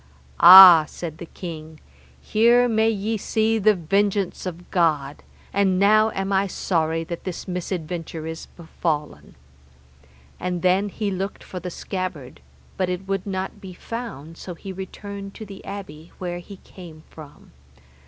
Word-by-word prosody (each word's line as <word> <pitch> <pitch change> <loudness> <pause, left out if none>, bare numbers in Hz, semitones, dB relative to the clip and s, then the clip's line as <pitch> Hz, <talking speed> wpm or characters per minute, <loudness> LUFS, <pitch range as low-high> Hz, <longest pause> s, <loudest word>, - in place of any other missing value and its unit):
Ah, 175 -2 +11
said 160 -1 -8
the 170 - -8
king, 160 -3 -9 0.4
here 235 - +3
may 220 -1 +2
ye 220 +1 -2
see 220 +2 0
the 215 +1 +4
vengeance 195 +2 -1
of 175 0 -8
God, 150 -5 0 0.3
and 195 -2 +2
now 215 +3 +4
am 195 +1 -2
I 195 +1 +2
sorry 165 -3 -1
that 170 +1 -7
this 185 -3 -6
misadventure 170 -3 -5
is 160 0 -7
befallen. 160 -3 -4 1.0
And 180 -1 -3
then 190 +3 +2
he 205 0 -3
looked 195 +1 -4
for 185 - -7
the 180 +1 -6
scabbard, 175 - -6 0.4
but 185 -1 0
it 180 +1 -4
would 195 0 -2
not 190 -1 -4
be 190 -2 -9
found, 175 - -8
so 180 - -7
he 190 +3 -8
returned 195 +1 -8
to 220 - -8
the 195 -1 -11
abbey 170 -5 -9
where 175 -1 -5
he 195 +3 -12
came 170 -5 -13
from. 150 -2 -14
185 Hz, 150 wpm, -23 LUFS, 165-200 Hz, 1.0 s, Ah